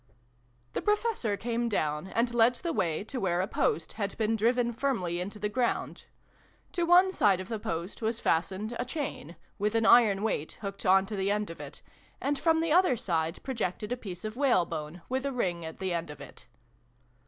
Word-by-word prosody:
The - - -1
Professor 420 - 0
came 235 +2 -1
down, 150 -4 -1
and 235 +4 0
led 240 +1 +5
the 335 +5 -3
way 165 - 0
to 255 +4 -5
where 175 -4 +1
a 185 - +2
post 160 - 0
had 200 -3 -3
been 225 0 +1
driven 235 +2 +2
firmly 205 -10 -1
into 200 +4 -5
the 210 - -1
ground. 240 +3 -1 0.7
To 345 -2 -1
one 360 +2 +6
side 200 - +3
of 185 - -7
the 225 -2 -3
post 170 +1 -4
was 225 +1 -1
fastened 190 +7 0
a - - +1
chain, 250 - -5 0.2
with 210 +2 0
an 225 0 +3
iron 215 -4 +6
weight 160 -8 -1
hooked 200 -1 -5
on 190 +1 +5
to 210 - -5
the 195 0 0
end 210 -3 0
of 165 - -9
it, 145 0 -9 0.4
and 280 +1 -1
from 325 -1 +3
the 330 -1 0
other 360 -8 +4
side 165 -4 -1
projected 220 -4 -3
a - - +1
piece 190 -6 -8
of 215 +1 -4
whalebone, 170 - 0
with 260 +1 -1
a 280 - -1
ring 180 -9 -1
at 160 0 -7
the 190 -2 -2
end 170 -2 -2
of 150 -1 -9
it. 140 - -12
210 Hz, 200 wpm, -29 LUFS, 180-245 Hz, 0.7 s, one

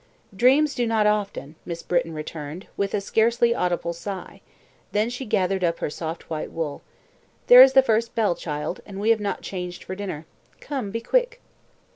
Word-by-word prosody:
"Dreams 275 +7 +4
do 240 -1 -1
not 220 -2 +2
often," 205 -8 -1
Miss 170 -1 -6
Britton 170 -2 0
returned, 155 +2 -7
with 200 -1 -1
a 205 - -1
scarcely 235 +3 +2
audible 175 -4 -1
sigh; 190 +3 -7 0.5
then 215 +3 +1
she 250 +2 -5
gathered 190 -3 0
up 170 -1 +1
her - - -3
soft 165 +1 -6
white 155 -2 -4
wool. 155 -3 -4 0.6
"There 245 +1 +10
is 265 0 +8
the 265 - +7
first 230 -1 0
bell, 215 -5 +2
child, 150 +1 -5
and 195 -2 -8
we 215 +3 +3
have 225 - +3
not 205 - -3
changed 180 -2 -6
for - - -6
dinner. 185 -6 -5 0.3
Come, 265 -8 -4
be 230 +3 -4
quick." - - +1
200 Hz, 180 wpm, -24 LUFS, 170-235 Hz, 0.6 s, There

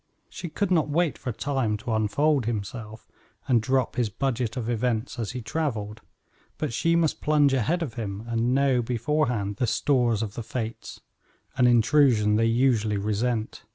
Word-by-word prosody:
She 175 - -7
could 200 +4 -2
not 160 -4 +2
wait 155 -3 +1
for 125 - -5
Time 125 -3 -1
to 110 +2 -4
unfold 120 +5 +1
himself, 110 0 -5 0.4
and 120 -4 +3
drop 130 +1 0
his 120 -3 +1
budget 120 0 -2
of 115 -3 -3
events 120 +1 -1
as 115 0 -3
he 125 -2 -5
traveled, 110 -8 -3 0.6
but - - -3
she 165 +8 +2
must 165 -2 +1
plunge 150 -2 +3
ahead 155 +8 +1
of 135 -8 -5
him, 105 -3 -5
and 115 +2 0
know, 135 -2 +3
beforehand, 120 -4 -1
the 125 - 0
stores 120 -3 +1
of 105 -2 -5
the 120 - -5
fates 115 0 -6 0.5
an 125 -1 +4
intrusion 120 -3 +4
they 115 +1 +3
usually 115 -3 +2
resent. 110 +3 -2
120 Hz, 165 wpm, -26 LUFS, 110-135 Hz, 0.6 s, an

